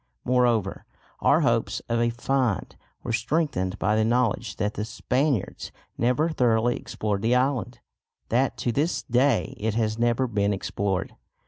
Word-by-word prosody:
Moreover 120 -6 +1 0.4
our - - +4
hopes - - +1
of 115 0 0
a 120 0 +2
"find" 120 -2 -1 0.3
were 120 - -3
strengthened 115 - 0
by 105 +2 +1
the 110 - +3
knowledge 120 -1 0
that 105 -1 -1
the 105 - -3
Spaniards 125 +2 -1 0.2
never 125 +7 +1
thoroughly 120 -5 +2
explored 105 -2 -3
the 115 +3 +2
island; 130 -4 0 0.5
that 130 +3 +1
to 120 - -1
this 145 +8 0
day 125 +1 +2
it 110 0 -1
has 110 -1 0
never 120 +2 +2
been 105 -3 0
explored. 95 -1 -2
115 Hz, 145 wpm, -25 LUFS, 105-125 Hz, 0.5 s, our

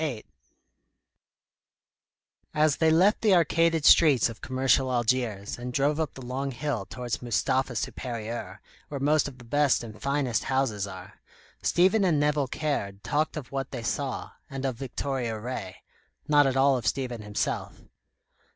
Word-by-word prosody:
VIII 135 -9 -3 2.3
As 150 -1 +3
they 160 - +3
left 185 +7 +4
the 210 -4 +5
arcaded 165 -2 +2
streets 145 -8 +6
of 115 - -10
commercial 130 0 +1
Algiers, 120 -4 -1
and 125 +1 -5
drove 145 +4 +1
up 160 -2 -2
the 130 - -9
long 135 +3 -3
hill 125 -6 -3
towards 120 -2 -4
Mustapha 125 +2 0
Supérieur, 115 +1 -5 0.3
where 140 - -5
most 150 +2 +2
of 135 -2 -9
the 125 - -13
best 140 +2 +2
and 110 -2 -10
finest 140 -5 0
houses 125 -7 0
are, 95 0 -11 0.4
Stephen 190 +4 +3
and 165 -6 +3
Nevill 145 -1 +1
Caird 100 -10 -3
talked 155 +2 0
of 140 -5 -7
what 135 -1 -3
they 120 -3 -6
saw, 135 +3 -3 0.2
and 135 0 -5
of 130 -2 -1
Victoria 130 -3 -3
Ray; 105 -5 -6 0.4
not 145 -2 +5
at 135 0 0
all 135 0 +4
of 115 - -5
Stephen 125 -4 -2
himself. 105 0 -3
130 Hz, 150 wpm, -27 LUFS, 120-145 Hz, 2.3 s, streets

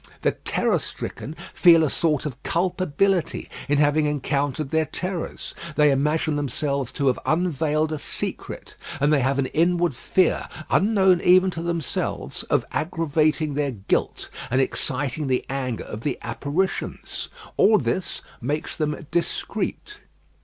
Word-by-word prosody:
The - - +4
terror - - 0
stricken 150 - -6 0.2
feel 165 -2 +7
a 155 - +2
sort 155 -4 +1
of 140 -2 -5
culpability 180 +1 0 0.2
in 145 - +3
having 150 +1 +3
encountered 145 0 -1
their 160 -1 +2
terrors; 180 +1 -4 0.2
they 150 -1 +5
imagine 150 +2 +1
themselves 140 -2 -1
to 140 - -1
have 130 -2 +2
unveiled 155 -2 +1
a 155 - -2
secret; - - -5 0.3
and 145 +2 +3
they 145 - +4
have 135 +1 +1
an 140 - +2
inward 175 +3 +2
fear, 180 +8 +1 0.2
unknown 190 -4 +4
even 185 +1 +5
to 165 - -5
themselves, 170 -4 -2
of - - +2
aggravating 155 -2 +1
their 145 0 0
guilt, 105 -7 -2 0.2
and 130 - +2
exciting 135 +2 -1
the 130 -1 0
anger 130 -4 -2
of 105 - -7
the 140 +2 -1
apparitions. 145 +11 -2 0.3
All 215 +1 +6
this 185 -3 -2 0.2
makes 150 +6 -2
them 150 0 -2
discreet. 410 - -2
150 Hz, 140 wpm, -24 LUFS, 140-170 Hz, 0.3 s, feel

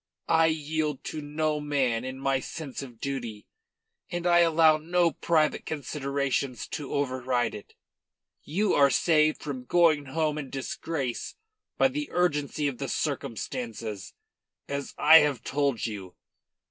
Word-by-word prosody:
I 165 0 +5
yield 155 -2 -2
to 155 - -5
no 150 +1 -1
man 135 -6 0
in 130 0 -5
my 135 0 +1
sense 140 0 -6
of 125 -4 -10
duty, 120 -6 -4 0.6
and 175 -1 -4
I 175 -1 +5
allow 160 -2 +5
no 170 +2 +2
private 155 -2 +1
considerations 140 -3 -2
to 145 -3 -5
override 130 -3 0
it. 105 - -11 0.7
You 195 +7 0
are 140 -1 +5
saved 155 +3 +2
from 130 -4 -5
going 160 -2 +3
home 155 +2 -1
in 140 -3 -6
disgrace 135 -1 -4 0.4
by 265 - +4
the 295 +2 -4
urgency 150 -4 0
of 135 -4 -4
the 135 - -3
circumstances, 115 - -4 0.5
as 140 -1 -4
I 160 +2 +9
have 145 -6 0
told 140 -5 0
you. 100 -5 -6
145 Hz, 135 wpm, -27 LUFS, 130-155 Hz, 0.7 s, I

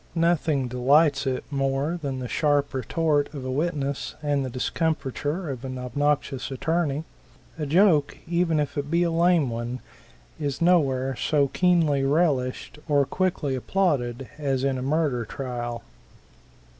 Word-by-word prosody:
Nothing 160 -5 +2
delights 140 +3 +3
it 130 -1 -1
more 135 +4 0
than 135 -3 -3
the 125 -1 -4
sharp 145 +1 +1
retort 145 +3 0
of 135 -2 -6
a 130 - -2
witness 140 -1 -2
and 145 -2 +1
the 130 - -3
discomfiture 155 +4 -2
of 130 -3 -5
an 130 -1 -5
obnoxious 135 +1 -1
attorney. 155 +2 -1 0.6
A 150 - -2
joke, 160 -2 +3
even 170 -2 +1
if 145 0 -2
it 145 0 -4
be 170 +2 +2
a 170 - +1
lame 165 -5 +3
one, 120 +2 -4 0.6
is 140 -2 -2
no 175 +1 +5
where 135 -2 -1
so 140 +1 +1
keenly 165 -6 +2
relished 140 -2 0
or 145 -1 +4
quickly 175 -2 -1
applauded 130 -5 0
as 135 -3 0
in 135 -1 0
a - - -4
murder 140 -3 0
trial. 120 -1 -5
145 Hz, 145 wpm, -25 LUFS, 130-160 Hz, 0.6 s, no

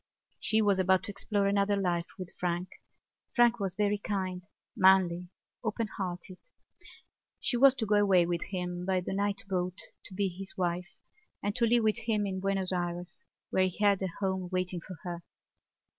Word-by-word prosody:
She 220 0 +2
was 200 -2 +3
about 185 0 +3
to - - -5
explore 205 0 0
another 200 0 +2
life 175 -3 0
with 185 -2 -7
Frank. 175 +1 -1 0.7
Frank 240 -1 +5
was 195 -3 -2
very 205 0 +1
kind, 185 -3 -3 0.3
manly, 180 -2 +4 0.3
open 225 0 -1
hearted. 180 -1 -5 1.0
She 270 - -1
was 270 +2 +6
to 230 - -2
go 210 0 +3
away 195 -4 +5
with 170 0 -2
him 180 -2 -4
by 185 0 +1
the 180 - -4
night 200 0 -1
boat 180 -1 -1 0.3
to 190 - -7
be 200 0 +1
his 190 +1 -7
wife 180 0 -2 0.5
and 205 +1 -1
to 235 - +3
live 235 0 +4
with 220 +1 +2
him 220 -2 0
in 190 -1 -2
Buenos 195 -1 -1
Ayres 175 0 -3 0.3
where 185 0 +3
he 185 - -7
had 205 -2 +3
a 190 - 0
home 190 -2 -1
waiting 185 -1 -1
for 185 - -9
her. 175 -1 -5
190 Hz, 175 wpm, -30 LUFS, 180-205 Hz, 1.0 s, was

